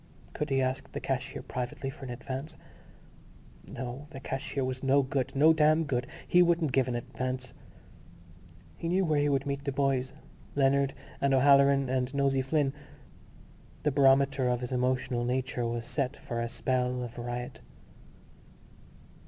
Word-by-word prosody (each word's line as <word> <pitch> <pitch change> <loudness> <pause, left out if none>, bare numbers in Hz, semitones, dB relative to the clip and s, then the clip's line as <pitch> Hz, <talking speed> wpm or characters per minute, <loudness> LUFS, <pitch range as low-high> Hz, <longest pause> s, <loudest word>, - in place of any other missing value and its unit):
Could 150 - -3
he 135 -1 +2
ask 130 +1 -2
the - - -4
cashier 135 -1 -3
privately 135 +2 -4
for 135 0 -10
an - - -7
advance? 130 +5 -6 1.2
No, 130 +3 -6
the 140 -4 -8
cashier 135 0 -3
was 130 0 -3
no 135 +1 +4
good, 130 0 -2
no 155 +4 +6
damn 155 +1 +4
good: 125 -4 -1 0.2
he 180 - +5
wouldn't 170 -4 +3
give 130 0 +2
an 125 - -2
advance.... 130 +1 -4 1.2
He 165 - -3
knew 185 +2 +2
where 155 -3 +2
he 145 0 +2
would 140 -1 +1
meet 140 0 -3
the 140 - -1
boys: 135 -1 0 0.4
Leonard 140 0 +2 0.3
and 140 -1 +3
O'Halloran 140 0 +5
and 130 0 0
Nosey 135 -1 +2
Flynn. 135 0 +1 1.1
The 150 - +2
barometer 135 -1 +4
of 125 0 0
his 125 - -5
emotional 125 -1 0
nature 125 -1 -1
was 115 0 -3
set 140 -2 -2
for 120 -2 -4
a 115 - -2
spell 125 0 -1
of 120 0 -7
riot. 120 +1 -5
135 Hz, 155 wpm, -29 LUFS, 125-140 Hz, 1.2 s, no